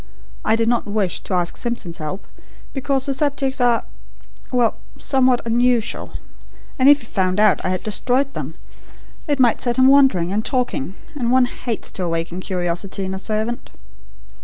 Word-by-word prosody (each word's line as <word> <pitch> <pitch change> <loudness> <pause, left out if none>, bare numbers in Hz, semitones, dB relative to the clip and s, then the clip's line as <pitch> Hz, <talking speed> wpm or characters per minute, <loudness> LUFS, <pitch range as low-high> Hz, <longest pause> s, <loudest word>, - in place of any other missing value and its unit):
I 220 - +3
did 225 0 0
not 235 -2 +1
wish 205 -3 -1
to 190 - -3
ask 175 -1 0
Simpson's 235 -8 -3
help, 155 +5 -5 0.5
because 270 -1 0
the 275 - 0
subjects, 270 -2 -1
are 240 -1 +3 0.7
well, 245 -3 +2 0.2
somewhat 260 -3 +2
unusual, 235 0 +1 0.6
and 260 +2 +6
if 290 0 +6
he - - -11
found 185 -2 0
out 215 -2 +4
I - - 0
had 185 -1 -2
destroyed 255 +6 0
them - - -5 0.7
it 290 -2 0
might 245 -3 +3
set 240 0 +1
him 260 - +5
wondering 260 -11 +4
and 215 +2 0
talking, 245 - -1 0.2
and 245 -5 -1
one 255 0 +5
hates 240 -2 -5
to 185 - -5
awaken 165 +1 -2
curiosity 185 +1 -2
in 190 - -3
a 190 - -4
servant. 220 +3 -3
230 Hz, 165 wpm, -20 LUFS, 190-260 Hz, 0.7 s, and